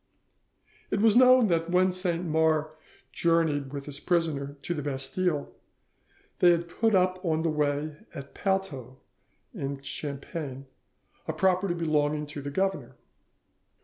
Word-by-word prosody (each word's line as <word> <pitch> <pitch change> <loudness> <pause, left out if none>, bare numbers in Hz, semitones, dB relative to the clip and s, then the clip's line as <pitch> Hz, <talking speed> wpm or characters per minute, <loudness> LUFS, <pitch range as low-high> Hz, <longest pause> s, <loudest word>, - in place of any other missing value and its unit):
It 200 - 0
was 220 0 +4
known 255 0 +7
that 165 -1 +1
when 185 +1 +3
Saint 180 -1 -1
Mars 160 -1 +1 0.4
journeyed 160 -5 +1
with 140 -1 -6
his 145 -1 -8
prisoner 150 -6 -1
to 175 - -2
the 155 - -4
Bastille, 145 +3 -2 0.9
they 180 - +6
had 170 0 +2
put 220 +5 +1
up 185 0 +1
on 160 -2 0
the 165 - +1
way 150 0 -1
at 140 0 -9
Palteau, 190 - -2 0.6
in 140 0 -4
Champagne, 140 -1 -5 0.6
a - - -1
property 185 -1 +1
belonging 150 -2 0
to 145 0 -7
the 140 - -5
governor. 190 +5 -2
160 Hz, 135 wpm, -28 LUFS, 145-185 Hz, 0.9 s, known